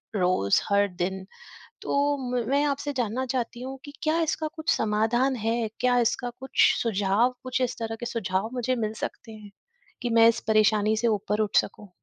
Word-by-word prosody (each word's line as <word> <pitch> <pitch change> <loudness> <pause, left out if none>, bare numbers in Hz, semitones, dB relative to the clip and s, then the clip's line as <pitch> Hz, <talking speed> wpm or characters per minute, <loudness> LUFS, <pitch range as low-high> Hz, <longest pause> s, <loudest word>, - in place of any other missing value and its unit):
रोज़, 180 - +2
हर 200 0 +3
दिन। 190 +1 -4 0.6
तो 285 +1 +1 0.2
म 245 -2 0
मैं 280 +1 +3
आपसे 285 0 -2
जानना 250 -1 -1
चाहती 240 -2 -3
हूँ 265 +1 -6
कि 285 - -9
क्या 315 +1 +1
इसका 320 0 -1
कुछ 315 0 -1
समाधान 225 +5 +1
है? 225 0 -1
क्या 250 0 +3
इसका 245 +1 0
कुछ 265 0 +3
सुझाव 215 +2 +1
कुछ 255 0 -2
इस 250 - -1
तरह 225 -1 -4
के 240 - -4
सुझाव 200 -2 -2
मुझे 255 +1 0
मिल 215 -2 -2
सकते 225 - -6
हैं, 210 -2 -12 0.5
कि 240 - -1
मैं 230 0 +6
इस 230 0 +1
परेशानी 215 0 +3
से 235 +2 +1
ऊपर 210 0 -1
उठ 210 -1 0
सकूँ? 210 - -3
230 Hz, 185 wpm, -26 LUFS, 210-255 Hz, 0.6 s, मैं